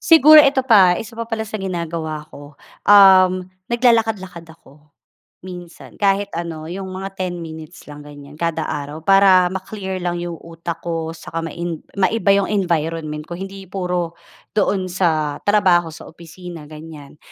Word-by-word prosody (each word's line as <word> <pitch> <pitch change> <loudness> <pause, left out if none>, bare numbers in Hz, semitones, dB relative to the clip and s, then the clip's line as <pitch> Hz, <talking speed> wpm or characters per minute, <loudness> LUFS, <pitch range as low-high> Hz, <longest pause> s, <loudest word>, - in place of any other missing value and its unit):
Siguro 310 -1 +7
ito 275 -2 +3
pa, 195 -8 +6
isa 220 +4 -7
pa 230 - -4
pala 225 -1 -2
sa 215 0 -6
ginagawa 165 -4 -4
ko, 145 +1 -12 0.3
um, 190 -2 +6 0.2
naglalakad-lakad 225 -8 0
ako 150 -2 -20 0.5
minsan. 175 -2 -11
Kahit 200 0 +1
ano, 165 -2 -6
mga 190 +1 -7
10 180 -2 -4
minutes 160 0 -10
lang, 145 0 -11
ganyan 145 0 -13
kada 165 -1 -2
araw 145 0 -5
para 190 0 +5
ma-clear 190 0 -5
lang 175 -1 -3
'yong 175 -1 -5
utak 170 0 -8
ko 165 -1 -3
saka 165 0 -6
main 170 0 -5 0.2
maiba 200 +2 +1
'yong 200 - +1
environment 165 -5 -2
ko, 175 - -8
hindi 195 +2 -8
puro 180 -2 -3 0.4
doon 200 -2 0
sa 160 -5 -1
trabaho, 185 -5 +3
sa 155 - -11
opisina, 170 -1 -11
ganyan. 155 -2 -12
175 Hz, 145 wpm, -19 LUFS, 160-195 Hz, 0.5 s, Siguro